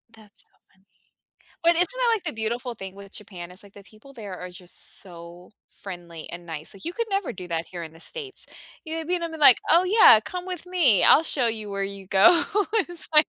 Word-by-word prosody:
That's 210 -2 -17
so - - -32 0.3
funny. 190 +1 -33 0.8
But 335 - +5
isn't 355 +2 +2
that, - - 0
like, 410 -5 -5
the 305 - -2
beautiful 235 +2 -3
thing 195 -2 -9
with 200 0 -13
Japan? 185 -4 -7
It's, 185 +3 -11
like, 200 -1 -18
the 200 - -13
people 215 +7 -18
there 205 -6 -8
are 180 - -7
just 180 0 -2
so 175 -1 -12 0.2
friendly 175 -4 -10
and 175 0 -9
nice. 160 -1 -7
Like, 195 - -13
you 340 - -3
could 465 +4 -3
never 395 -2 -2
do 180 -1 -9
that 165 -1 -3
here 175 -2 -7
in 160 -1 -9
the 165 - -17
states, 415 - -3 0.4
you 315 - -6
know, 325 - -3
I - - -7
mean 350 +1 -2
I'm, 335 -1 -4
like, 295 -6 +7
oh, 340 +3 +5
yeah, 370 - +7
come 360 0 -6
with 360 -2 -6
me 330 - +3
I'll 310 - +7
show 270 -6 +2
you 215 -2 -3
where 200 0 -3
you 195 -1 -8
go. 205 - +5 0.3
It's, 350 -6 -2
like 305 0 +8
215 Hz, 235 wpm, -24 LUFS, -, 0.8 s, like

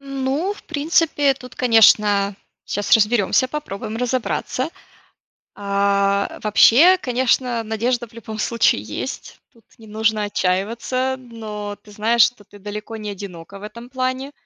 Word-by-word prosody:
Ну, 275 +7 -2
в - - -15
принципе, 310 -1 +1
э, - - 0
тут, 250 -1 -13
конечно, 210 -4 +4 0.3
сейчас 205 0 -3
разберемся, 225 +3 +3
попробуем 225 -7 -5
разобраться. 250 +3 -2 0.8
А, 200 0 0
вообще, 265 - +6
конечно, 250 -4 0
надежда 235 +2 -1
в 230 - -25
любом 220 -1 -8
случае 230 +1 +2
есть. - - -7
Тут 230 -3 -25
не 225 - -15
нужно 215 0 0
отчаиваться. 230 +7 -1
Но 215 -4 -7
ты 210 - -16
знаешь, 225 +3 +2
что 240 -4 -1
ты 205 - -17
далеко 210 +3 -7
не 210 -1 -5
одинока 195 -1 -9
в - - -13
этом 235 +3 -10
плане. 260 +2 -3
225 Hz, 135 wpm, -20 LUFS, 205-255 Hz, 0.8 s, вообще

